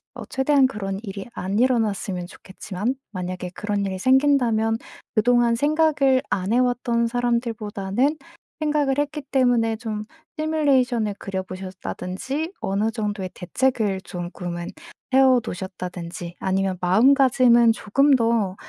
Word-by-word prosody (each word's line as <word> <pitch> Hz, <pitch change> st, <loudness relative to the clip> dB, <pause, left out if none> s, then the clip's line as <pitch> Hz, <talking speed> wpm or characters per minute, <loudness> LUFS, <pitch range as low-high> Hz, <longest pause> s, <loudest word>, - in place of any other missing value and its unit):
어 -, -, -7 dB
최대한 265 Hz, 0 st, +3 dB
그런 195 Hz, -6 st, -3 dB
일이 195 Hz, 0 st, -7 dB
안 195 Hz, +4 st, -2 dB
일어났으면 210 Hz, -7 st, 0 dB
좋겠지만 195 Hz, +6 st, -5 dB, 0.2 s
만약에 180 Hz, -1 st, -5 dB
그런 205 Hz, -1 st, -2 dB
일이 190 Hz, -1 st, -3 dB
생긴다면 245 Hz, -4 st, +3 dB, 0.4 s
그동안 240 Hz, +1 st, +3 dB
생각을 290 Hz, -2 st, +2 dB
안 190 Hz, +2 st, -1 dB
해 -, -, +4 dB
왔던 245 Hz, -2 st, +1 dB
사람들보다는 235 Hz, +1 st, -1 dB, 0.4 s
생각을 295 Hz, -3 st, +1 dB
했기 295 Hz, +1 st, -1 dB
때문에 245 Hz, -5 st, +2 dB
좀 215 Hz, -2 st, -5 dB, 0.3 s
시뮬레이션을 265 Hz, -8 st, +1 dB
그려 190 Hz, -1 st, -4 dB
보셨다든지 190 Hz, -, -5 dB
어느 205 Hz, +3 st, 0 dB
정도의 205 Hz, -4 st, -3 dB
대책을 210 Hz, -1 st, 0 dB
조금은 175 Hz, -1 st, -6 dB, 0.4 s
해 265 Hz, -, +6 dB
어 260 Hz, -2 st, +6 dB
놓으셨다든지 175 Hz, -1 st, -6 dB
아니면 190 Hz, -1 st, 0 dB
마음가짐은 240 Hz, +3 st, +5 dB
조금 275 Hz, +7 st, +3 dB
더 225 Hz, -5 st, +1 dB
225 Hz, 310 characters per minute, -23 LUFS, 190-260 Hz, 0.4 s, 해